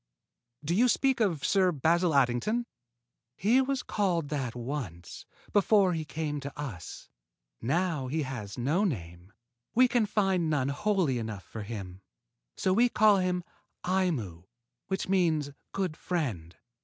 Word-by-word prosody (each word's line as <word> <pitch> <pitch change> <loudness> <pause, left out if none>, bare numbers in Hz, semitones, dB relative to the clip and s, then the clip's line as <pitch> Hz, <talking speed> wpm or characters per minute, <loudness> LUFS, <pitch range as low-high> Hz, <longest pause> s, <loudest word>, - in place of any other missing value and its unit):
"Do 165 - 0
you 235 +7 +4
speak 265 +2 +2
of 180 -10 +1
Sir 190 -2 +3
Basil 165 +2 +2
Addington?" 140 - +2 0.7
"He 230 +8 +4
was 270 0 -1
called 175 -8 0
that 135 -6 -3
once, 120 - -6 0.3
before 200 -2 +4
he 160 -2 -3
came 150 -1 -3
to 140 +1 -8
us. 115 - -7 0.5
Now 160 0 0
he 155 +4 -1
has 115 -7 -6
no 145 +11 +1
name. 90 - -4 0.4
We 255 +2 +6
can 235 -3 +2
find 190 -5 +1
none 140 -3 +1
holy 175 - +1
enough 110 -4 -5
for 110 - -8
him; 100 -2 -5
and 90 +1 -13 0.6
so 185 - +2
we 240 +5 +4
call 215 -3 +5
him 180 -1 0 0.4
Aimu, 150 - -1 0.4
which 190 - -2
means 165 -6 +2 0.2
good 185 -5 -2
friend." 115 - -3
160 Hz, 145 wpm, -29 LUFS, 125-195 Hz, 0.7 s, We